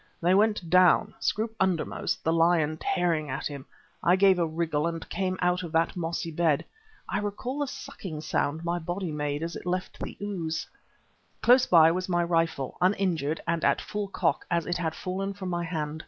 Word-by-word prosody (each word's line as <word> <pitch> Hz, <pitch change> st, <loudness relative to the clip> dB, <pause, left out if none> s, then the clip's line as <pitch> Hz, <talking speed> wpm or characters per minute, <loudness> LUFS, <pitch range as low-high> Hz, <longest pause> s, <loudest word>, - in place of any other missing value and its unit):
They 175 Hz, +2 st, +3 dB
went 210 Hz, -2 st, +2 dB
down, 180 Hz, +1 st, +5 dB
Scroope 220 Hz, 0 st, -1 dB
undermost, 185 Hz, -4 st, -1 dB
the 160 Hz, -, +2 dB
leopard 165 Hz, -2 st, +2 dB
tearing 165 Hz, -5 st, 0 dB
at 135 Hz, -, -4 dB
him. 140 Hz, -2 st, -5 dB, 0.3 s
I 175 Hz, -, +4 dB
gave 190 Hz, -1 st, +5 dB
a 170 Hz, -, +2 dB
wriggle 160 Hz, -1 st, -1 dB
and 165 Hz, -1 st, -4 dB
came 185 Hz, -1 st, -1 dB
out 180 Hz, 0 st, +2 dB
of 170 Hz, -3 st, -6 dB
that 165 Hz, +1 st, +2 dB
mossy 170 Hz, -1 st, -3 dB
bed 160 Hz, -3 st, +1 dB, 0.4 s
I -, -, -1 dB
recall 210 Hz, +7 st, -4 dB
the 290 Hz, -, 0 dB
sucking 160 Hz, -10 st, -7 dB
sound 155 Hz, +1 st, -1 dB
my 175 Hz, +1 st, 0 dB
body 175 Hz, +1 st, -3 dB
made 150 Hz, 0 st, -2 dB
as 170 Hz, +1 st, -4 dB
it -, -, -7 dB
left 185 Hz, +1 st, -3 dB
the -, -, -6 dB
ooze. 175 Hz, -6 st, -3 dB, 0.8 s
Close 255 Hz, +1 st, +6 dB
by 165 Hz, -2 st, +7 dB
was 185 Hz, +2 st, -2 dB
my 175 Hz, -1 st, +2 dB
rifle, 165 Hz, -6 st, -1 dB
uninjured 180 Hz, -5 st, +1 dB
and 170 Hz, 0 st, 0 dB
at -, -, +3 dB
full 210 Hz, -1 st, -4 dB
cock 195 Hz, -, 0 dB
as 170 Hz, -1 st, +1 dB
it 175 Hz, -, -1 dB
had 160 Hz, -2 st, -2 dB
fallen 195 Hz, +2 st, -3 dB
from 190 Hz, -2 st, -5 dB
my 175 Hz, -1 st, -1 dB
hand. 155 Hz, -2 st, -3 dB
170 Hz, 190 wpm, -27 LUFS, 160-185 Hz, 0.8 s, by